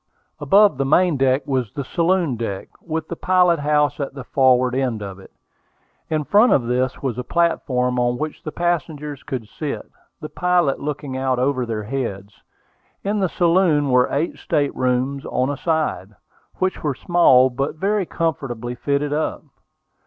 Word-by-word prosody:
Above 200 -7 +4
the - - +2
main 170 +4 +3
deck 135 0 +1
was 130 -5 -1
the 140 - -4
saloon 170 -1 +1
deck, 100 -4 -5
with 160 -1 -4
the 170 - -5
pilot 180 -2 +3
house 150 0 +1
at 140 -1 -4
the 135 - -7
forward 130 -1 +3
end 130 -4 -1
of 100 -1 -8
it. 95 - -15 0.8
In 155 -1 0
front 210 - +4
of 125 - +3
this 125 +3 -1
was 125 -3 -2
a - - -3
platform 125 -7 0
on 120 0 +1
which 155 +2 -5
the 155 - -6
passengers 155 -4 -2
could 130 -6 -5
sit, 150 +5 -6 0.3
the 155 - -6
pilot 175 -5 +1
looking 145 -2 -4
out 130 -1 0
over 130 -1 0
their 110 -2 -3
heads. 105 -5 -4 0.7
In 205 +1 -1
the 190 -2 +1
saloon 170 -5 +2
were 125 0 +4
eight 150 +5 -2
state 145 -3 -1
rooms 130 +2 0
on 130 +2 0
a 145 - -4
side, 155 - -2 0.4
which 185 0 -1
were 145 -4 -1
small, 130 -8 +4
but 135 +5 -2
very 195 +2 0
comfortably 125 -7 -3
fitted 140 +3 -1
up. 155 +1 -2
140 Hz, 165 wpm, -21 LUFS, 125-165 Hz, 0.8 s, Above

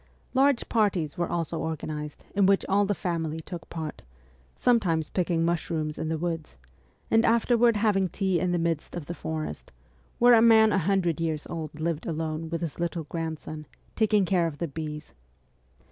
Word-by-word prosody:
Large 270 -1 +3
parties 185 -9 +1
were 175 -1 -1
also 165 -1 -2
organised 150 -2 -5
in 200 -1 +4
which 195 0 +3
all 200 +1 +3
the 205 - 0
family 165 -3 -2
took 165 0 -8
part, 160 -2 -6 0.5
sometimes 175 -10 +2
picking 170 -2 +1
mushrooms 160 -2 -2
in 160 0 -2
the 160 - -1
woods, 165 - -4 0.5
and 225 0 +5
afterward 235 0 +4
having 205 -3 +2
tea 190 -1 0
in 180 -1 0
the 175 - +1
midst 165 -2 -2
of 170 -4 -5
the 175 - -5
forest, 160 -2 -5 0.5
where 245 +1 +6
a 225 - +7
man 220 -2 +6
a 195 - +3
hundred 175 -3 +1
years 160 -2 -2
old 155 -2 -5
lived 165 -1 -2
alone 160 0 -3
with 165 0 -3
his 165 -2 -4
little 170 -1 -2
grandson, 155 -1 -5 0.3
taking 215 -3 +3
care 175 -2 +2
of 150 -3 -6
the 170 - -2
bees. 150 0 -6
170 Hz, 175 wpm, -27 LUFS, 160-195 Hz, 0.5 s, a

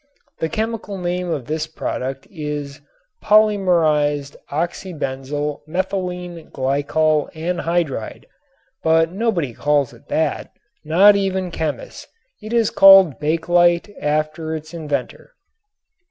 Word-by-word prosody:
The 160 - -1
chemical 220 +1 -3
name 180 0 -2
of 150 -7 -3
this 155 +3 -3
product 135 -4 -4
is 150 -4 -5 0.4
"polymerized 170 -9 +3
oxybenzyl 145 -3 -3
methylene 180 -1 -4
glycol 145 +3 0
anhydride," 165 -6 -2 0.6
but 165 0 +3
nobody 185 - -1
calls 145 0 +1
it - - -19
that, - - -1 0.3
not 190 +7 +6
even 190 -2 -1
chemists. 155 -3 -5 0.3
It 215 - -8
is 230 -2 +2
called 195 -8 +7
"Bakelite" 175 +4 +2
after 155 +2 -1
its 155 +1 -8
inventor. 150 - -5
160 Hz, 100 wpm, -20 LUFS, 150-180 Hz, 0.6 s, called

